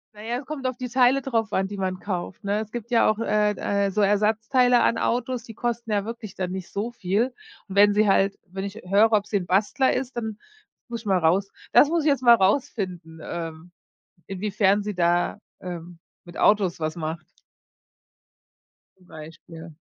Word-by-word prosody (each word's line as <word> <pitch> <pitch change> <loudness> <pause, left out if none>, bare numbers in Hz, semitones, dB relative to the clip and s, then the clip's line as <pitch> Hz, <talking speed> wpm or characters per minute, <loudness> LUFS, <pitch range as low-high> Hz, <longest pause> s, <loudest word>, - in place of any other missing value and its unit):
Na 210 - -11
ja, 235 +2 -2
es 275 - -11
kommt 280 -1 -6
auf 255 -1 -3
die 250 0 -5
Teile 255 +2 +3
drauf 230 -5 -1
an, 190 0 +1
die 200 +1 -7
man 185 -1 -2
kauft, 185 +1 -5
ne. 200 +1 0
Es 215 - -8
gibt 240 0 -7
ja 230 - +4
auch 215 0 0
äh 210 -2 +2 0.4
äh, - - -3
so 210 - 0
Ersatzteile 225 +5 +3
an 230 - +2
Autos, 245 0 -1
die 225 - -10
kosten 235 0 -3
ja 205 -1 0
wirklich 225 -3 -7
dann 185 -1 -3
nicht 190 -1 -6
so 215 +4 -3
viel. 225 +4 -1 0.3
Und 195 - -8
wenn 205 +1 +6
sie 210 +1 +3
halt 195 0 +2
wenn 190 +2 -6
ich 200 0 -6
höre, 205 +4 +4
ob's 205 0 +1
'n 195 -3 +1
Bastler 210 +9 +2
ist, 255 -1 -3
dann 220 -3 -4 0.5
muss 235 -1 -5
ich - - -22
mal 195 -2 +2
raus 180 +4 +1 0.2
das 290 - +7
muss 335 -1 +1
ich - - 0
jetzt 275 -3 +1
mal 235 -1 +8
rausfinden, 190 - -1
ähm, 165 +1 -7 0.6
inwiefern 200 +1 +1
sie 210 0 -4
da, 175 0 +1 0.2
ähm, 175 -1 -8 0.3
mit 175 - -13
Autos 195 -4 +3
was 155 -1 -2
macht. 160 0 -5 1.7
Zum 180 -1 -24
Beispiel. 160 +1 -11
205 Hz, 195 wpm, -24 LUFS, 185-235 Hz, 1.7 s, mal